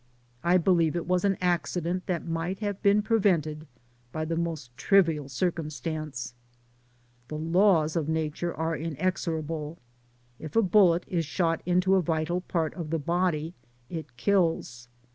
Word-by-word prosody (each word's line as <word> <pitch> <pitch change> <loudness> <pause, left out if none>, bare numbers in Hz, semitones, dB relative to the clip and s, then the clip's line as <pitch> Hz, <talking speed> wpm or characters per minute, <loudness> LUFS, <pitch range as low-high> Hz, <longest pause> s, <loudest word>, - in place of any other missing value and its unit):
I 175 +2 +4
believe 170 -3 +2
it 170 - -2
was 180 0 +1
an 195 -2 +2
accident 180 0 -1
that 180 -3 -2
might 165 +3 -2
have 205 -2 -3
been 205 +1 +4
prevented 170 -9 +1 0.4
by 155 +3 -3
the 165 +1 -2
most 160 -8 -4
trivial 160 -3 +2
circumstance. 155 -3 -3 0.9
The 150 - -5
laws 165 -1 +3
of 160 -2 -1
nature 160 +2 -1
are 160 +1 -2
inexorable. 160 -1 -3 0.6
If 155 - -8
a 225 - +5
bullet 180 -3 +4
is 170 -3 -1
shot 165 -1 0
into 180 +2 +3
a 190 - +5
vital 165 +2 -1
part 165 -4 -1
of 165 -4 -6
the 165 - 0
body 170 0 0 0.4
it 155 -8 -7
kills. 165 -8 0
165 Hz, 145 wpm, -27 LUFS, 155-180 Hz, 0.9 s, a